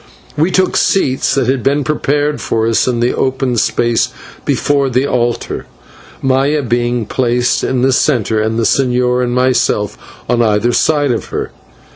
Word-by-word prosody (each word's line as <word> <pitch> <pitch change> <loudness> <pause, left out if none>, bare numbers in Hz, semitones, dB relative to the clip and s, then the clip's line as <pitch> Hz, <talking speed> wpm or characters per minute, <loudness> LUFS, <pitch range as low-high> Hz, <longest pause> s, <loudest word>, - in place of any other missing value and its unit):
We 155 +4 +1
took 185 0 +1
seats 135 -9 +1
that 135 -2 +1
had 130 0 +1
been 140 +4 +1
prepared 145 0 -1
for 110 0 -1
us 115 +1 +1
in 120 -2 0
the 120 - +1
open 130 -1 -1
space 120 +1 +1 0.4
before 140 -2 +1
the 130 +2 +1
altar, 120 -3 -2 0.6
Maya 135 +3 +1
being 120 -1 -1
placed 125 +2 0
in 125 -1 0
the 135 0 +3
centre, 115 -5 +1
and 110 +1 -1
the 115 - 0
señor 125 +1 +1
and 120 - -1
myself 125 -5 +1 0.3
on 120 -1 +1
either 110 +1 +2
side 145 +1 +2
of 115 - -2
her. - - -5
125 Hz, 160 wpm, -14 LUFS, 120-135 Hz, 0.6 s, the